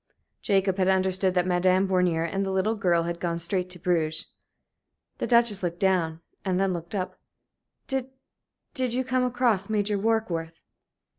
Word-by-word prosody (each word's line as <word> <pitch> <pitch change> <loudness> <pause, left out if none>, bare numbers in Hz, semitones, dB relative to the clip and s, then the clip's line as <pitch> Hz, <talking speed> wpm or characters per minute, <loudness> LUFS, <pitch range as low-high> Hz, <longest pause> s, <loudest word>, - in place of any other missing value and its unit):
Jacob 195 -2 +1
had 185 - +3
understood 190 0 +2
that 180 -1 +2
Madame 185 +1 +3
Bornier 180 -3 +2
and 195 +4 -1
the 195 - -2
little 190 +3 +1
girl 180 -6 +2
had 170 0 -4
gone 170 -1 -1
straight 180 +2 -2
to 180 - -8
Bruges. 160 -3 0 0.9
The - - -1
Duchess 235 -4 +3
looked 175 -1 -3
down 170 -4 +1 0.2
and 185 -1 0
then 195 -1 +1
looked 170 +3 -6
up. 185 -1 -3 0.7
"Did 265 -1 -2 0.6
did 255 -4 0
you 260 - +1
come 255 0 0
across 240 -5 +1
Major 210 -1 0
Warkworth?" 190 -7 -1
190 Hz, 160 wpm, -26 LUFS, 175-210 Hz, 0.9 s, had